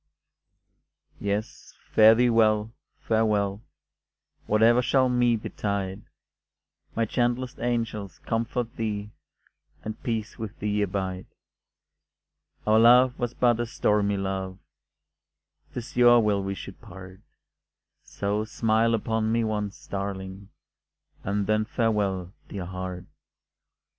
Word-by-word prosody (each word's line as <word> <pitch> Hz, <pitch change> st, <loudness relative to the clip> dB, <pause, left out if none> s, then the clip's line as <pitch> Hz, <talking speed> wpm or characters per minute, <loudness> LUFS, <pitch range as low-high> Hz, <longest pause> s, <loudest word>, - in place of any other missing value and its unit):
Yes, 100 Hz, +2 st, -4 dB, 0.2 s
fare 110 Hz, +1 st, +7 dB
thee 120 Hz, +1 st, +3 dB
well, 110 Hz, -1 st, +2 dB, 0.3 s
farewell, 105 Hz, -2 st, +1 dB, 0.9 s
Whate'er 115 Hz, +3 st, +4 dB
shall 130 Hz, +1 st, +2 dB
me 120 Hz, -1 st, +3 dB
betide 100 Hz, -2 st, -3 dB, 0.9 s
May 115 Hz, -, +1 dB
gentlest 120 Hz, +2 st, -1 dB
angels 115 Hz, -6 st, -2 dB
comfort 115 Hz, +1 st, -3 dB
thee, 105 Hz, -2 st, -3 dB, 0.7 s
And 110 Hz, 0 st, -6 dB
peace 110 Hz, -3 st, -3 dB
with 110 Hz, -2 st, -6 dB
thee 105 Hz, 0 st, -1 dB
abide; 95 Hz, -2 st, -3 dB, 1.4 s
Our 110 Hz, +1 st, +4 dB
love 125 Hz, +2 st, +6 dB
was 120 Hz, -1 st, -2 dB
but 120 Hz, -2 st, +3 dB
a 120 Hz, -, -1 dB
stormy 105 Hz, -3 st, +1 dB
love, 95 Hz, -1 st, -3 dB, 1.1 s
'Tis 125 Hz, +3 st, -7 dB
your 120 Hz, -1 st, +7 dB
will 105 Hz, -3 st, +2 dB
we 100 Hz, 0 st, -3 dB
should 95 Hz, -, -10 dB
part 95 Hz, -3 st, -12 dB, 0.8 s
So 100 Hz, +1 st, -2 dB
smile 115 Hz, +1 st, +1 dB
upon 110 Hz, 0 st, -1 dB
me 115 Hz, 0 st, +2 dB
once, 105 Hz, -2 st, -3 dB
darling, 95 Hz, 0 st, -5 dB, 0.7 s
And 100 Hz, +1 st, -1 dB
then 110 Hz, +1 st, +2 dB
farewell, 105 Hz, -6 st, -1 dB, 0.2 s
dear 95 Hz, -3 st, -5 dB
heart. 90 Hz, 0 st, -6 dB
110 Hz, 110 wpm, -26 LUFS, 100-115 Hz, 1.4 s, fare